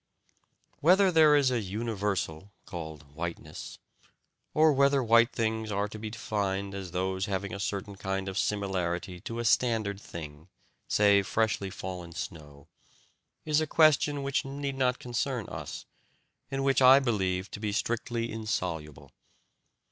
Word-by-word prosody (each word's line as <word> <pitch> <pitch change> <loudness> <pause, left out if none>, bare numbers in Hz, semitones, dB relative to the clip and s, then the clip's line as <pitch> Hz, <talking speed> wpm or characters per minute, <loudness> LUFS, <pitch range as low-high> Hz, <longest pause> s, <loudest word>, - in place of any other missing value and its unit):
Whether 185 +4 +5
there 155 -3 +6
is 140 -3 +4
a 120 -2 0
universal, 100 -4 -3
called 80 -4 -8
"whiteness," 85 +2 -6 0.7
or 155 0 +5
whether 140 0 +3
white 115 +2 +5
things 110 -1 -1
are 100 +1 0
to 110 - -8
be 110 0 -5
defined 100 -3 -2
as 95 -2 -5
those 95 +2 -1
having 100 -1 -3
a 100 - -5
certain 100 0 -3
kind 95 0 -3
of 95 - -4
similarity 95 -2 -1
to 115 +6 -6
a 120 - -2
standard 110 -3 +2
thing, 80 -3 -9 0.4
say 100 -1 +5
freshly 105 -1 0
fallen 90 -2 -7
snow, 75 -4 -8 0.8
is 155 0 +2
a 155 - -1
question 150 -2 +4
which 140 -1 0
need 140 0 -4
not 125 -2 +1
concern 120 -1 -2
us, - - -7 0.6
and 135 0 -2
which 135 0 +3
I 130 +1 +9
believe 95 -7 0
to - - -6
be 105 -1 -2
strictly 115 +2 -2
insoluble. 80 - -4
105 Hz, 140 wpm, -29 LUFS, 95-125 Hz, 0.8 s, I